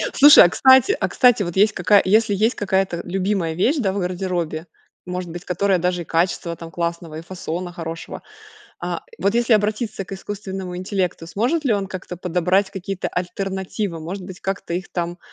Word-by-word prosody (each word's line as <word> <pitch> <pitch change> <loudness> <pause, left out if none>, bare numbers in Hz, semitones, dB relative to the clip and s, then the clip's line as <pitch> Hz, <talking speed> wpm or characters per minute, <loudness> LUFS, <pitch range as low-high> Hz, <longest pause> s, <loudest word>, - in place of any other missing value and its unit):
Слушай, 290 +1 +9
а - - +4
кстати, 265 - +5
а - - 0
кстати, 245 -4 +4
вот 175 -3 -3
есть 210 +2 +4
какая 205 -2 +4
Если 210 +1 +3
есть 220 +5 +2
какая-то 190 -3 0
любимая 185 -2 -1
вещь, 250 - +2
да, 200 -7 +1
в 200 - -3
гардеробе. 180 -3 -3 0.4
Может 180 -1 -5
быть, 175 +1 -7
которая 185 +1 +1
даже 180 0 -1
и - - -18
качества, 170 0 0
там, 165 0 -10
классного, 170 -2 -4
и 160 - -6
фасона 175 0 -5
хорошего. 165 -1 -7 0.6
А, - - -4 0.2
вот 200 +3 +1
если 240 0 +2
обратиться 215 0 0
к 195 - -11
искусственному 190 -2 -6
интеллекту. 185 -2 -2
Сможет 245 - -1
ли 245 - +3
он 195 -2 -1
как-то 180 -1 -7
подобрать 180 +3 +1
какие-то 195 0 -4
альтернативы? 190 0 -3
Может 180 +5 -6
быть, 185 -1 -9
как-то 195 -3 -3
их, 185 +2 -5
там, 175 0 -3
185 Hz, 180 wpm, -21 LUFS, 175-205 Hz, 0.6 s, Слушай